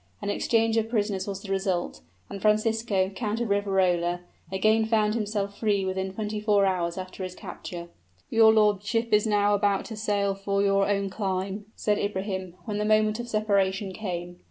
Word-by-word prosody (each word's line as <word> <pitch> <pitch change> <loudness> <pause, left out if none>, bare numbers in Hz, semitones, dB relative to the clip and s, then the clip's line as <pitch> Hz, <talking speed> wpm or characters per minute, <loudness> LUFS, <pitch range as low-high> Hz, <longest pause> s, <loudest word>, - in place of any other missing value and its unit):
An 205 - -2
exchange 225 +1 +1
of 225 0 0
prisoners 205 -4 -1
was 195 -1 -5
the 195 - -6
result, 190 - -1 0.3
and 195 - -7
Francisco, 215 -2 +2
Count 215 +1 -3
of 235 -3 -1
Riverola, 185 -3 +1 0.3
again 215 +4 +3
found 215 -1 +2
himself 205 -2 -2
free 205 -3 +1
within 190 0 -2
twenty 210 +1 -3
four 205 -2 +3
hours 175 -2 0
after 185 +1 -7
his 185 0 -6
capture. 175 -2 -8 0.4
"Your 225 -1 +6
lordship 215 +2 +2
is 210 +1 +4
now 205 -1 +3
about 200 -1 +1
to 225 - -7
sail 205 -2 0
for 200 0 -1
your 195 0 +2
own 200 -1 0
clime," 195 0 -3
said 210 -1 0
Ibrahim, 190 -3 -3
when 210 -2 -3
the - - 0
moment 215 +1 +2
of 240 - -4
separation 200 -3 +1
came. 175 -3 -5
205 Hz, 175 wpm, -26 LUFS, 190-215 Hz, 0.4 s, Your